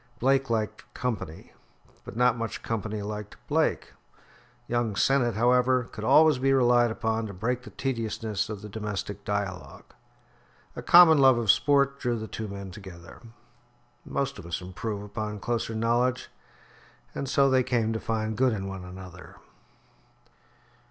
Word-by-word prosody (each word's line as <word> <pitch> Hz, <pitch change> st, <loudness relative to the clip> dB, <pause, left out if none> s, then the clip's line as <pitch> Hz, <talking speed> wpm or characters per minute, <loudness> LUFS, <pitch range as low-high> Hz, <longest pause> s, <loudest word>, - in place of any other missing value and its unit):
Blake 135 Hz, +1 st, +2 dB
liked 110 Hz, +1 st, -3 dB
company, 95 Hz, -10 st, -5 dB, 0.5 s
but -, -, -10 dB
not 125 Hz, -1 st, +4 dB
much 115 Hz, -1 st, -5 dB
company 110 Hz, -1 st, -3 dB
liked 105 Hz, 0 st, -6 dB
Blake. -, -, 0 dB, 0.7 s
Young 120 Hz, -3 st, -1 dB
Sennett, 120 Hz, -1 st, +2 dB
however, 125 Hz, +2 st, +3 dB
could 105 Hz, -, -8 dB
always 155 Hz, +4 st, +5 dB
be 135 Hz, +1 st, +2 dB
relied 120 Hz, -2 st, +4 dB
upon 110 Hz, 0 st, -2 dB
to 100 Hz, -, -9 dB
break 120 Hz, +6 st, -2 dB
the -, -, -11 dB
tediousness 115 Hz, -5 st, -3 dB
of 105 Hz, -2 st, -6 dB
the -, -, -6 dB
domestic 105 Hz, -1 st, -5 dB
dialogue. 100 Hz, -4 st, -4 dB, 0.9 s
A -, -, -5 dB
common 170 Hz, -3 st, +7 dB
love 130 Hz, -2 st, +6 dB
of 115 Hz, -3 st, +4 dB
sport 140 Hz, -1 st, +2 dB
drew 120 Hz, -2 st, -1 dB
the 110 Hz, 0 st, -6 dB
two 110 Hz, 0 st, -5 dB
men 100 Hz, -1 st, -7 dB
together. 90 Hz, -3 st, -12 dB, 0.8 s
Most 135 Hz, -6 st, -3 dB
of 95 Hz, -, -10 dB
us 85 Hz, -, -3 dB
improve 100 Hz, +3 st, -5 dB
upon 105 Hz, +1 st, -5 dB
closer 115 Hz, +1 st, -2 dB
knowledge, 120 Hz, +3 st, 0 dB, 0.8 s
and 135 Hz, -, -4 dB
so 140 Hz, 0 st, +4 dB
they 130 Hz, -1 st, +4 dB
came 120 Hz, -3 st, 0 dB
to 110 Hz, -, -2 dB
find 110 Hz, -1 st, -2 dB
good 130 Hz, +1 st, +2 dB
in 95 Hz, -2 st, -4 dB
one 95 Hz, -1 st, -6 dB
another. 90 Hz, 0 st, -11 dB
110 Hz, 150 wpm, -27 LUFS, 105-125 Hz, 0.9 s, common